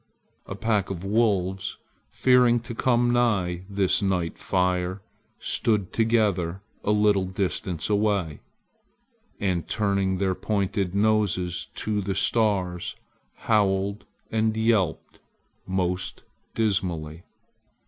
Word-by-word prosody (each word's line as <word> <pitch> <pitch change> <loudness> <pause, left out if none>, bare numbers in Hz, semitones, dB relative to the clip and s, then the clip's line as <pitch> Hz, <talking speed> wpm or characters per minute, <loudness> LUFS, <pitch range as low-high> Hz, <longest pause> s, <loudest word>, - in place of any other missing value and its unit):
A 95 - -5
pack 105 -2 0
of 95 -2 -5
wolves, 95 -2 0 0.3
fearing 125 -2 +4
to 120 0 -7
come 120 0 +2
nigh 95 -7 +1
this 100 -1 +1
night 90 -4 -1
fire, 90 0 0 0.4
stood 105 -5 0
together 105 -6 +1 0.2
a - - -2
little 105 -2 +3
distance 90 -3 -2
away, 100 -7 0 1.0
and, 90 -4 -1
turning 100 -3 0
their 95 0 +1
pointed 100 -2 -1
noses 100 -4 +1
to 105 -1 -1
the 95 0 -2
stars, 95 -6 0 0.5
howled 100 -1 +1 0.3
and 110 0 +1
yelped 110 -6 0 0.5
most 95 -1 -2 0.3
dismally. 90 -7 -1
100 Hz, 100 wpm, -25 LUFS, 90-110 Hz, 1.0 s, fearing